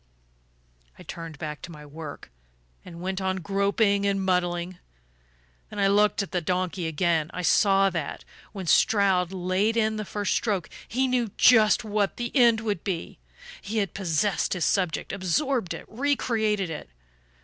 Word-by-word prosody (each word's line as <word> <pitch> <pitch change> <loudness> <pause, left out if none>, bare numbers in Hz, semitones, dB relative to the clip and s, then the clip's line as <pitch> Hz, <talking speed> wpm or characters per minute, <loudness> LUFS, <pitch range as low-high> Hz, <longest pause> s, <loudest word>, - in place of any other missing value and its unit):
"I - - -12
turned 165 -3 -8
back 150 0 -6
to 170 - -9
my 150 -2 -11
work, 145 - -9 0.5
and 170 -1 -10
went 190 +1 -3
on 190 0 0
groping 200 +2 +1
and 200 0 +1
muddling; 180 -1 -1 0.9
then - - -10
I 200 -1 +3
looked 205 0 +3
at 195 - -9
the 180 - -1
donkey 180 0 -1
again. 160 0 0
I 180 - -3
saw 195 +1 +4
that, 165 -5 -5 0.3
when 195 -3 -6
Stroud 190 -1 +3
laid 190 +4 0
in 220 -1 +1
the 215 - -3
first 205 0 -2
stroke, 200 -6 -1 0.2
he 260 +3 0
knew 245 -3 0
just 225 -1 +5
what 210 -2 -1
the 240 +2 -4
end 235 -4 +5
would 210 -6 -2
be. 175 - -4 0.4
He 215 +3 -4
had 200 -3 0
possessed 180 0 0
his 180 -3 -1
subject, 180 -3 0
absorbed 200 - 0
it, - - -6
recreated 220 - 0
it. 150 - -7
195 Hz, 160 wpm, -26 LUFS, 175-215 Hz, 0.9 s, just